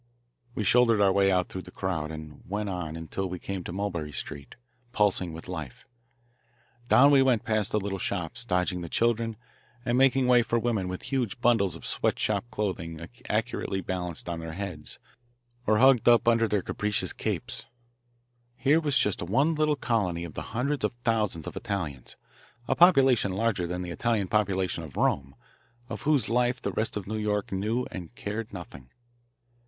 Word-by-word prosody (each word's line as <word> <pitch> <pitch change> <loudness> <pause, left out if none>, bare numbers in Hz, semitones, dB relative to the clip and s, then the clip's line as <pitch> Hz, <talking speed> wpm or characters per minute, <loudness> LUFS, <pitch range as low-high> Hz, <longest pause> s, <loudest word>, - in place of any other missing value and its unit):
We 110 - -1
shouldered 115 0 +4
our 100 -1 +5
way 95 0 +3
out 90 -1 +2
through 95 - -5
the 90 - -12
crowd 90 -5 -3
and 75 -1 -9
went 105 +1 -2
on 90 -4 -4
until 80 +4 -4
we 90 - -4
came 95 +1 -5
to - - -5
Mulberry 90 -5 -3
Street, 70 +1 -7 0.4
pulsing 100 -6 +2
with 80 +1 -9
life. 80 -8 -7 1.0
Down 140 +3 +7
we 140 -1 +6
went 125 -4 +3
past 110 -3 0
the 105 - +2
little 95 -1 -3
shops, 95 +6 -3
dodging 90 -4 0
the 85 - -6
children, 115 0 +1 0.5
and 120 +1 +2
making 135 -1 +4
way 125 -1 +6
for 115 0 0
women 115 -5 0
with 90 0 -5
huge 125 -5 -2
bundles 110 -8 +3
of 85 - -10
sweatshop 120 - 0
clothing 85 -7 -4 0.2
accurately 110 -3 -1
balanced 90 -2 -4
on 85 -1 -3
their 80 -1 -6
heads 90 -5 -6 0.7
or 105 0 +4
hugged 130 -1 +6
up 120 0 +5
under 115 -1 +4
their 105 -3 0
capacious 105 -1 -1
capes. - - -3 0.9
Here 140 +5 +3
was 145 -3 +1
just 105 - +1
one 135 - +2
little 155 -1 +2
colony 100 -10 0
of 85 -3 -7
the - - -5 0.2
hundreds 140 +3 0
of - - 0
thousands 105 -8 0
of - - -7
Italians 80 -11 -4 0.5
a - - +2
population 135 - +5
larger 100 -3 0
than 90 +1 -3
the 90 - -5
Italian 110 +1 0
population 95 -5 0
of 75 - -10
Rome 70 -1 0 0.5
of - - -5
whose 150 -3 +2
life 125 +1 +1
the - - -3
rest 110 -1 -2
of 100 - -5
New 110 +2 -3
York 105 -1 -1
knew 110 +6 -1
and 90 +5 -8
cared 110 -3 -4
nothing. 70 -9 -10
100 Hz, 175 wpm, -28 LUFS, 90-120 Hz, 1.0 s, Down